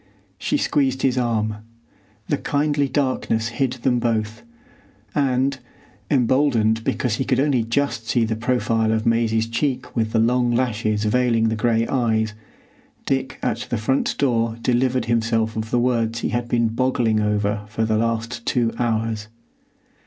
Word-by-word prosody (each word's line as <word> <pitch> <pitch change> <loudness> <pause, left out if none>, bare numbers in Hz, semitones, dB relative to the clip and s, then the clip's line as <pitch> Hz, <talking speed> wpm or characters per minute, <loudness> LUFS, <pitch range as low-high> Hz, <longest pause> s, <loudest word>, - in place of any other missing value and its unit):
She - - 0
squeezed 135 -2 0
his 130 -1 +2
arm. 110 -4 0 0.7
The 145 - 0
kindly 145 0 0
darkness 130 -5 0
hid 125 +1 -1
them 125 0 0
both, 110 -2 -1 0.7
and, 135 -1 +1 0.5
emboldened 120 -4 +2
because 115 -2 -1
he - - 0
could - - +1
only 140 -3 +2
just 115 -1 -1
see 120 -2 +2
the 110 0 -2
profile 115 -2 0
of 110 0 0
Maisie's 115 -1 +2
cheek 130 +2 -2
with 110 -2 0
the - - +1
long 120 +2 +2
lashes 110 -4 0
veiling 115 0 +2
the 110 - -1
gray 115 +1 +1
eyes, 110 -4 0 0.7
Dick 135 -4 -1
at 115 - -2
the 120 - 0
front 130 +6 0
door 115 -4 +1
delivered 125 +1 +1
himself 115 -1 0
of 110 0 -3
the 120 - +1
words 120 -2 0
he - - -1
had 120 0 -2
been 115 -2 +2
boggling 115 -2 +1
over 105 0 0
for 110 0 -1
the 110 -1 +1
last 115 +1 -2
two 115 -1 0
hours. 110 -2 -1
115 Hz, 155 wpm, -22 LUFS, 110-130 Hz, 0.7 s, his